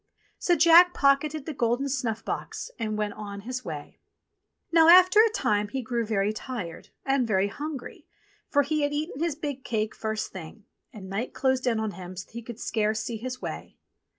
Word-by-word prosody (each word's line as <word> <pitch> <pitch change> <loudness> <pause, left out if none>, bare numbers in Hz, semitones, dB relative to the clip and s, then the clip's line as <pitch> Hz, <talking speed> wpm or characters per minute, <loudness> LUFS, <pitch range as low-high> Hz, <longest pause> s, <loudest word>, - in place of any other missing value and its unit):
So 350 - +3
Jack 340 +2 +7
pocketed 280 +1 +2
the 315 - -4
golden 245 +2 0
snuff 245 -5 -2
box - - -5
and 215 -1 -2
went 210 -1 -1
on 200 -1 -7
his 250 +3 -5
way. 155 -6 -7 0.7
Now, 330 -1 +6
after 370 +3 +8
a 450 - +5
time, 210 - 0
he 260 +5 -4
grew 235 -1 -2
very 210 -1 +1
tired, 215 -7 -6 0.2
and 270 -3 +1
very 200 -2 +2
hungry, 290 +3 -7 0.4
for 285 -1 +3
he 305 +2 -1
had 290 0 0
eaten 295 -1 -3
his 335 -3 0
big 285 -4 -5
cake 215 -1 -1
first 220 -1 -3
thing, 190 +4 -10 0.3
and 195 -3 -10
night 200 +6 -4
closed 260 -1 +1
in 230 -2 +2
on 220 -1 -2
him 185 -1 -9
so 180 - -6
that - - -27
he 235 - -6
could 235 0 -9
scarce 215 -2 0
see 230 +1 -4
his 255 +3 -6
way. - - -6
240 Hz, 195 wpm, -27 LUFS, 215-285 Hz, 0.7 s, after